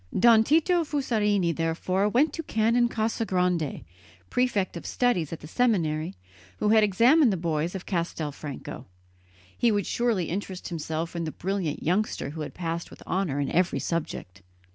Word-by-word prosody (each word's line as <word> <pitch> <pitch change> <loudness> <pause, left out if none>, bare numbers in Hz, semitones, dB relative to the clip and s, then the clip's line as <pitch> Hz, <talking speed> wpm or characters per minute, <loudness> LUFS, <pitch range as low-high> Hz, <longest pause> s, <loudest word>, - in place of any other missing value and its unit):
Don 225 +1 +6
Tito 330 +6 +3
Fusarini 210 - +1
therefore 185 +5 0
went 265 +8 +2
to 330 - -3
Canon 235 -2 +2
Casagrande, 180 - 0 0.5
prefect 215 -8 +1
of 170 - -6
studies 240 - +1
at 165 - -6
the 155 - -9
seminary, 170 -6 0 0.4
who 210 - +1
had 220 0 +6
examined 235 - +5
the 190 - -1
boys 165 +1 -1
of 190 - -6
Castelfranco; 150 -7 -4 0.7
he 235 - +3
would 205 -3 0
surely 230 -7 0
interest 185 +1 -5
himself 165 0 -4
in 170 -1 -2
the 155 - -3
brilliant 185 -4 -3
youngster 180 -4 0
who 155 +1 -6
had 150 - -6
passed 170 -1 -3
with - - -14
honour 180 -7 -1
in 140 - -1
every 180 +1 +2
subject. 125 - -4
185 Hz, 155 wpm, -27 LUFS, 165-225 Hz, 0.7 s, Don